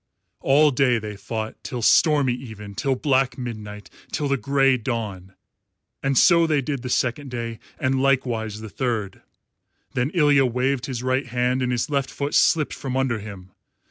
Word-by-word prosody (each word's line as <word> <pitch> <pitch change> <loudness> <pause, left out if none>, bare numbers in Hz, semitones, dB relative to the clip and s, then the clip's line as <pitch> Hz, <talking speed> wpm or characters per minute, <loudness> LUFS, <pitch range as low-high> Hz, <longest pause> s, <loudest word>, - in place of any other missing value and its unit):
All 145 +2 +4
day 125 -2 +3
they 105 -1 -6
fought, 110 +2 -6
till 125 -4 -5
stormy 145 -1 +4
even, 110 -5 -8
till 135 +6 0
black 135 -1 +1
midnight, 105 -5 -7 0.2
till 145 - -1
the 140 - +2
grey 135 0 +2
dawn, 105 -6 -4 0.7
and 135 -1 0
so 170 -2 +6
they 155 -2 +2
did 140 -1 -3
the 125 - -5
second 130 +3 -1
day, 115 -2 -5 0.2
and 130 0 0
likewise 120 -6 0
the 110 - -7
third. 115 -7 -3 0.7
Then 125 +2 0
Ilya 145 -4 +4
waved 125 +2 -1
his 125 -3 -4
right 130 +1 0
hand, 125 +1 0
and 125 -1 0
his 120 +2 0
left 140 -2 0
foot 140 +1 -4
slipped 155 -3 +3
from 130 -1 -4
under 130 -4 0
him. 100 -3 -10
125 Hz, 170 wpm, -23 LUFS, 115-135 Hz, 0.7 s, so